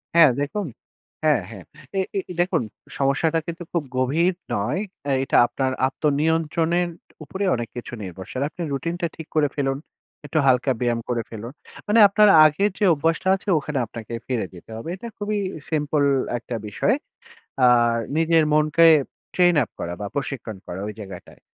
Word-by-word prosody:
হ্যাঁ, 165 -3 +8
দেখুন, 165 +7 -2 0.6
হ্যাঁ, 150 -8 +3
হ্যাঁ। 100 -5 -10 0.3
এ - - +3 0.2
এ - - +3 0.2
দেখুন, 175 -7 +1 0.4
সমস্যাটা 145 +4 +1
কিন্তু 170 +1 -5
খুব 170 -3 0
গভীর 160 +8 +2 0.2
নয়। 105 - -1 0.3
অ্যা 140 - +1
এটা - - +2
আপনার 130 +1 -1 0.2
আত্মনিয়ন্ত্রণের 160 +4 +1 0.4
উপরে 190 +7 -5
অনেক 120 -1 -4
কিছু 120 0 -7
নির্ভরশীল। 95 +6 -6
আপনি 175 - -10
রুটিন 165 +6 -2
টা 170 - +1
ঠিক 160 -1 -9
করে 150 -2 +4
ফেলুন। 135 -2 0 0.5
একটু 145 +2 -3
হালকা 130 +1 +3
ব্যায়াম 120 -1 0
করে 120 -1 0
ফেলুন। 115 +3 -8 0.3
মানে 220 +2 +4
আপনার 210 +1 +5 0.2
আগের 195 +8 +3
যে 210 - +3
অভ্যাসটা 165 +4 0
আছে, 195 - -11
ওখানে 145 -1 -3
আপনাকে 110 +1 -9
ফিরে 120 -6 -1
যেতে 90 +4 -14
হবে। 115 +9 -7
এটা 235 +5 -8
খুবই 210 0 -2 0.3
সিম্পল 150 -1 +1 0.3
একটা 120 0 -6
বিষয়। 105 - +1 0.7
আর 120 -1 +4 0.2
নিজের 165 0 +4
মনকে 155 +2 +4 0.5
ট্রেইন 175 -1 +4
আপ - - -21
করা 85 - -4
বা 105 - -3
প্রশিক্ষণ 130 -6 -4
করা, 90 +2 -6
ঐ - - -4
জায়গাটায়। 95 -3 -10
145 Hz, 160 wpm, -23 LUFS, 120-165 Hz, 0.7 s, হ্যাঁ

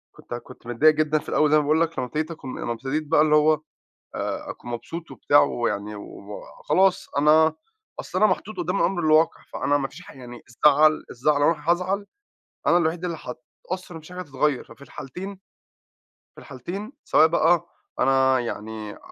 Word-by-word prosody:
كنت - - -10
كنت 120 0 -10
متضايق 150 +6 +4
جدًا 155 0 +1
في - - -10
الأول 150 -1 +2
زي 155 - +6
ما - - +4
باقول 155 +3 +2
لك، 165 0 -1
لمّا 125 - -2
ابتديت 155 +6 -3
أكم 135 -5 -7
لمّا 120 - -3
ابتديت 135 +6 -3
بقى 150 0 +4
اللي 150 -1 +4
هو 155 +1 +5 0.6
آآ - - -4
أكون 120 - -10
مبسوط 165 +8 -7
وبتاع 145 - +4
ويعني 105 -6 -1
و 100 0 -9 0.2
خلاص 190 0 +2
أنا 155 +2 +5 0.4
أصل - - -5
أنا 215 - +6
محطوط 215 -1 -3
قُدّام 180 +2 -1
الأمر 190 -2 +1
الواقع، 155 0 +3
فأنا 145 - +1
مفيش 135 -1 -5
حا - - -13
يعني 120 -2 -10
الزعل 150 +5 +4
الزعل 145 +4 +1
لو 145 - +5
أنا 155 0 0
هازعل، 185 +3 -1 0.6
أنا 175 - +5
الوحيد 170 +1 -1
اللي 170 -2 -2
هاتأثّر 175 +9 -8
ومفيش 160 +1 -11
حاجة 180 - -6
هتتغيّر، 145 -4 -1
ففي 115 +4 -16
الحالتين 180 +9 -8 1.0
في - - -13
الحالتين 190 - -7
سواء 155 - +5
بقى 165 +1 +2 0.3
أنا 130 0 +4
يعني 110 -2 -6
ع - - -13
155 Hz, 180 wpm, -24 LUFS, 130-170 Hz, 1.0 s, زي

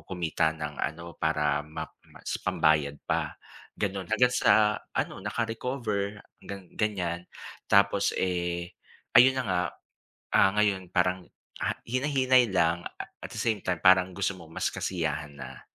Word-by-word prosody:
kumita 85 -3 0
ng 75 -1 -5
ano, 85 +2 -4
para 75 -2 +1
map 75 - -7 0.2
mas - - -4
pambayad 75 -2 +2 0.2
pa. - - 0 0.4
Ganon, 95 -3 -2
hanggang 125 0 +4
sa 105 -1 +4 0.2
ano, - - -2
naka-recover 110 -1 -2 0.3
gan 100 -2 -8
ganyan. 90 -5 -1 0.4
Tapos, 100 0 +4
eh, 85 -1 -1 0.5
ayun 130 +2 +7
na 130 - +1
nga, 90 -2 +1 0.7
ah, 95 - +6
ngayon 100 -3 +1
parang, 90 0 +1 0.4
ah, - - 0
hinay-hinay 130 -1 +3
lang 85 -1 +2
a - - -8 0.2
at - - -5
the - - -8
same 110 -3 0
time 95 - 0
parang 95 0 +6
gusto 100 0 0
mo 85 -2 -12
mas - - -1
kasiyahan 75 -1 -3
na. 65 -1 -9
95 Hz, 140 wpm, -28 LUFS, 85-105 Hz, 0.7 s, ayun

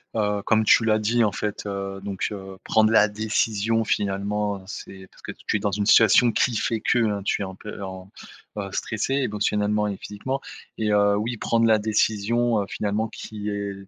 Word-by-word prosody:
heu, 105 -2 0
comme 110 0 +3
tu 115 +1 +5
l'as 110 -1 +3
dit, 115 +2 +2
en 105 - -1
fait, 105 -1 -4
heu, 100 -1 -4
donc, 100 -1 -3
heu, 95 -2 -8
prendre 110 0 +3
la 105 -1 +5
décision 110 +1 0
finalement 100 -1 -1
c'est 95 -1 -9
parce - - -20
que - - -7
tu - - +2
es - - -6
dans 100 -1 -1
une 100 +1 -1
situation 115 +2 +6
qui 120 0 +1
fait 115 0 -1
que 105 -3 +1
tu - - 0
es - - 0
un 95 0 -8
peu 105 0 -9
en 95 0 -8 0.5
bah, 100 -2 -4
stressé 110 +7 -2
émotionnellement 105 -4 0
et 100 - -4
physiquement 130 +7 -4 0.4
et 110 -1 0
heu, 100 0 +3
oui, 120 +3 -2
prendre 115 +1 +1
la 110 - +5
décision, 110 +1 +1
heu, - - -3
finalement 105 +2 -2
qui 105 -1 -7
est 100 -1 -3
105 Hz, 195 wpm, -24 LUFS, 100-110 Hz, 0.5 s, situation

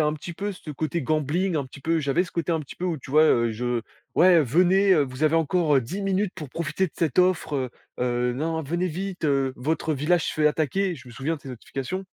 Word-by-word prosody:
un 150 - +1
petit 155 +3 -7
peu 200 +4 -4
ce 180 -4 -9
côté 155 +3 -2
gambling, 155 +6 0
un 145 - 0
petit 130 - -13
peu, 165 +4 +1
j'avais 145 +5 +1
ce 180 - -13
côté 170 0 -2
un 160 - 0
petit 145 - -10
peu, 180 - -4
où, 170 -4 -1
tu 130 - -12
vois? 155 +3 +6
Heu, 120 -7 +3
je: 120 +1 -2 0.3
«Ouais 175 -1 +6
venez, 185 +8 +4
vous 130 +1 -7
avez 155 +1 +3
encore, 165 -1 +2
heu, - - +4
10 150 - -5
minutes 195 0 0
pour 150 - -7
profiter 165 +5 -1
de 165 - -12
cette 160 -3 -1
offre, 180 -4 +2
heu 130 -2 -2 0.3
heu, 125 0 +1
non, 160 +5 -2
venez 170 +5 -1
vite, 185 +2 -5
heu, 135 -3 +1
votre 155 +4 -1
village 155 +5 +1
se - - -2
fait 155 -1 +3
attaquer», 160 +5 +1
je 125 - -13
me - - -11
souviens 135 +7 -2
de - - -15
ces 135 - -10
notifications. 135 +9 -5
155 Hz, 245 wpm, -25 LUFS, 135-180 Hz, 0.3 s, vois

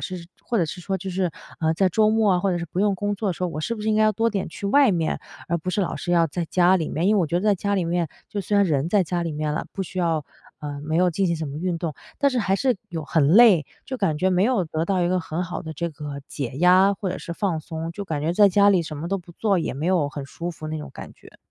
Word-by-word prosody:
是 180 -3 -6 0.2
或 235 - -1
者 175 - +3
是 180 - -7
说 190 +2 -2
就 190 - -6
是， 180 -1 0 0.3
呃， 160 0 +2
在 190 +3 +2
周 215 +4 +3
末 220 -2 +3
啊， 180 - +2
或 195 +1 +1
者 175 - 0
是 170 - -4
不 175 +4 -3
用 200 -1 +2
工 205 +2 -1
作 205 +1 -2
的 - - +1
时 180 +2 -4
候， 180 - 0
我 155 -2 -5
是 230 +9 -2
不 - - -8
是 215 - -2
应 - - +2
该 215 - +3
要 215 - +5
多 225 +3 +1
点 200 -6 -2
去 200 - -6
外 275 +4 +5
面， 165 -4 -1 0.3
而 170 - +1
不 170 +2 -4
是 205 - 0
老 185 - -1
是 175 - -4
要 170 -1 +4
在 170 +3 -3
家 180 +2 +4
里 165 -4 -2
面。 165 +4 -1
因 210 - +4
为 205 - +3
我 165 - 0
觉 170 - 0
得 - - -4
在 210 -1 +4
家 200 +2 -1
里 185 - 0
面， 170 -1 0 0.2
就 205 - -3
虽 205 +2 0
然 200 -1 +4
人 150 -2 0
在 195 0 +3
家 175 +1 -2
里 165 - -2
面 150 0 -2
了， 155 - -2
不 195 - -3
需 185 +1 -7
要 165 -4 0 0.3
呃， 145 -1 -6
没 155 +2 -1
有 180 +1 +3
进 195 +3 +1
行 170 - 0
什 155 - -4
么 140 0 -6
运 175 0 -2
动， 165 -3 -3 0.2
但 280 - +4
是 255 - -1
还 195 -2 +1
是 255 +1 +1
有 165 -3 -5
很 150 -1 +2
累， 195 -3 +7 0.2
就 260 - -5
感 165 -10 0
觉 185 +4 +2
没 180 0 +2
有 225 -4 +2
得 160 0 -2
到 185 +1 0
一 175 - +1
个 185 +1 +1
很 165 +1 -3
好 180 +1 -5
的 160 -1 -6
这 170 +3 -3
个 145 -2 -7
解 140 -5 -4
压 185 +3 +5
或 195 0 -4
者 - - -4
是 170 - -6
放 175 -2 -1
松， 160 +1 -5
就 200 +3 -6
感 160 -6 -3
觉 160 +3 0
在 205 +2 +6
家 200 +1 +4
里 185 -3 +3
什 155 -2 -7
么 155 +3 -5
都 195 - 0
不 175 -1 -14
做， 200 +1 +1
也 130 - -3
没 150 +5 -3
有 175 -6 +2
很 145 -1 -6
舒 170 +4 -5
服 155 - -9
那 155 0 -3
种 150 - -7
感 - - -9
觉。 - - -18
180 Hz, 345 characters per minute, -23 LUFS, 160-200 Hz, 0.3 s, 累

